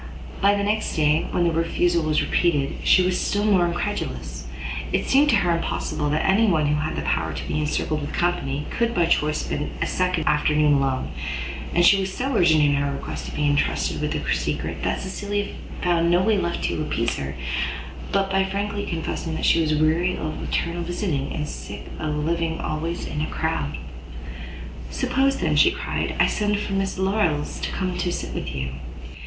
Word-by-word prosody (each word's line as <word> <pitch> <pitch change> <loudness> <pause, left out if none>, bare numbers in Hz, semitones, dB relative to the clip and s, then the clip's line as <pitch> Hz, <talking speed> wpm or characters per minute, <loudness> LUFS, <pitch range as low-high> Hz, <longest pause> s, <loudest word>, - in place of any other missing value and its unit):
But 200 +1 +4
the 200 - 0
next 215 +2 0
day, 155 0 +2
when 175 - +1
the 170 - +3
refusal 165 +1 +1
was 155 -1 +1
repeated, 145 -6 +1
she 185 - +6
was 180 0 +1
still 205 +1 0
more 190 -5 +4
incredulous; 170 - -3 0.4
it - - 0
seemed 285 +2 +5
to 235 - +5
her 175 -4 +2
impossible 150 -2 -2
that 150 +1 +1
any 205 +4 +4
one 160 -6 +3
who 145 - +2
had 155 - -2
the - - -3
power 80 +1 0
to 70 - -6
be - - -1
encircled 150 0 -1
with 145 - -4
company, 150 -5 -1
could 235 0 0
by 175 -2 +4
choice 150 -2 +1
spend 150 - -2
a - - +1
second 180 -3 0
afternoon 150 0 +3
alone: 135 -2 0 0.6
and 175 0 +5
she 195 +2 +7
was 190 0 -2
so 260 +6 -2
urgent 160 -6 +5
in 145 -1 +4
her 140 0 +1
request 140 - -5
to - - -7
be 150 - 0
entrusted 145 0 +1
with - - -1
the - - 0
secret, - - -2
that - - -1
Cecilia 205 +1 -3 0.3
found 170 -1 +3
no 175 +1 +4
way 220 +1 +3
left 170 -3 -1
to - - -1
appease 115 -6 -1
her, 70 0 -4 0.8
but 195 -1 +1
by 195 0 +3
frankly 205 +1 -2
confessing 165 -1 -3
she 165 - +4
was 155 -1 +1
weary 160 +4 +2
of 155 -1 -4
eternal 170 0 -1
visiting, 175 -5 -2
and 150 -1 -3
sick - - -8
of 155 -1 -2
living 165 0 -1
always 165 +3 -3
in 150 - -3
a 155 - -1
crowd. 75 - -2 1.1
"Suppose, 270 - +1
then," - - 0
cried - - +4 0.5
she, - - -5
"I - - +6
send 210 -1 +1
for 205 -1 -3
Miss 195 -1 -1
Larolles 190 -6 0
to - - -1
come 185 -1 -2
and 180 0 -3
sit 175 0 -2
with - - -4
you?" 65 -1 -3
170 Hz, 195 wpm, -24 LUFS, 150-195 Hz, 1.1 s, she